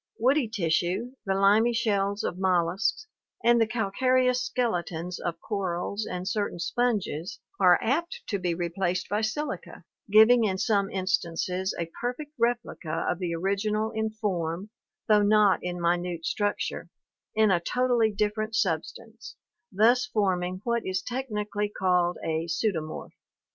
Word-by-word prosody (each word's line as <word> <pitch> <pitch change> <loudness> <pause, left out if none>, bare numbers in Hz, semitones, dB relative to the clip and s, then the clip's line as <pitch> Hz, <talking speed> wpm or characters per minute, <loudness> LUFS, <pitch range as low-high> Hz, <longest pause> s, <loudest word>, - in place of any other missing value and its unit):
Woody 260 +2 +3
tissue, 190 +3 0 0.2
the 190 - +1
limy 210 +5 +4
shells 200 -3 0
of 180 - -3
molluscs 190 - +1 0.4
and 235 0 +5
the 225 - +3
calcareous 250 +3 +1
skeletons 180 -9 -2
of 170 -1 -4
corals 200 -1 -3
and 180 +1 -4
certain 205 -2 -1
sponges 210 -1 -1 0.2
are 180 -2 +6
apt 325 +9 -1
to 200 - -2
be 175 -2 -1
replaced 175 +1 -2
by 210 +1 0
silica, 295 +8 -4 0.3
giving 220 +3 +7
in 190 -3 0
some 200 -1 +1
instances 185 -1 -1
a 170 -1 -4
perfect 250 +5 -3
replica 235 -8 -1
of 175 - -1
the 175 -2 -2
original 210 +4 -1
in 220 -1 -1
form, 195 -3 -3 0.4
though 210 -2 +5
not 205 -1 +4
in 180 0 -4
minute 175 -1 -1
structure, 205 -1 -2 0.5
in 215 -2 +4
a 175 - +3
totally 240 +3 +1
different 210 +2 -1
substance, 215 +5 -3 0.4
thus 235 +5 +3
forming 185 -5 -1
what 235 -1 0
is 185 0 -2
technically 210 -5 -3
called 180 -3 +1
a 160 +1 -1
pseudomorph - - -10
(see 210 +6 +1
Fig. 165 -4 -3
ioo). 155 0 -7
205 Hz, 145 wpm, -27 LUFS, 180-225 Hz, 0.5 s, giving